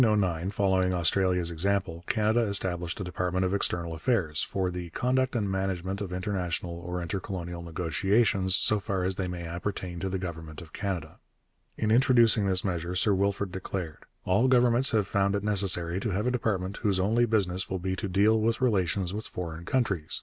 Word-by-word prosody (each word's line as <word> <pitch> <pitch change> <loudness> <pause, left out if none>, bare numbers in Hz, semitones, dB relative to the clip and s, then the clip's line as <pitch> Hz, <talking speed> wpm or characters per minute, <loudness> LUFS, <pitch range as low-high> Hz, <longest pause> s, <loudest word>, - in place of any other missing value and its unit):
In 120 - +5
1909, 95 -4 0
following 95 -2 +1
Australia's 90 0 +3
example, 90 0 -1
Canada 110 +1 +2
established 90 -4 0
a - - -3
department 90 +1 -1
of 90 - -1
External 85 -4 0
Affairs 80 -3 0
for 95 -2 -1
'the 90 -1 -6
conduct 130 +7 0
and 105 -4 0
management 95 0 -2
of 95 -3 -4
international 90 -2 -3
or 90 +1 -5
intercolonial 90 -1 -5
negotiations, 95 +4 +1
so 105 +2 +3
far 95 -1 -2
as 95 +1 0
they 95 - -2
may 90 -1 -5
appertain 90 +1 -5
to 95 +3 -2
the 95 - -2
government 80 -4 -7
of 85 -2 -13
Canada.' 90 -7 -4 0.6
In 110 -1 0
introducing 115 -4 +5
this 95 0 +1
measure 90 -1 -2
Sir 100 +3 +3
Wilfrid 100 0 0
declared: 95 -3 -5 0.2
'All 100 +8 +3
governments 125 0 +4
have 110 -3 +2
found 100 0 +1
it 100 - -2
necessary 95 -4 0
to 110 - -2
have 100 +2 -1
a 125 - +2
department 100 -6 -1
whose 100 -4 0
only 115 +5 +2
business 95 -4 0
will 95 - -2
be 95 +1 -2
to 100 - -3
deal 105 +4 +3
with 115 +1 +1
relations 95 -6 0
with 110 +1 -4
foreign 85 -1 -6
countries.... 100 -12 0
95 Hz, 185 wpm, -28 LUFS, 90-105 Hz, 0.6 s, In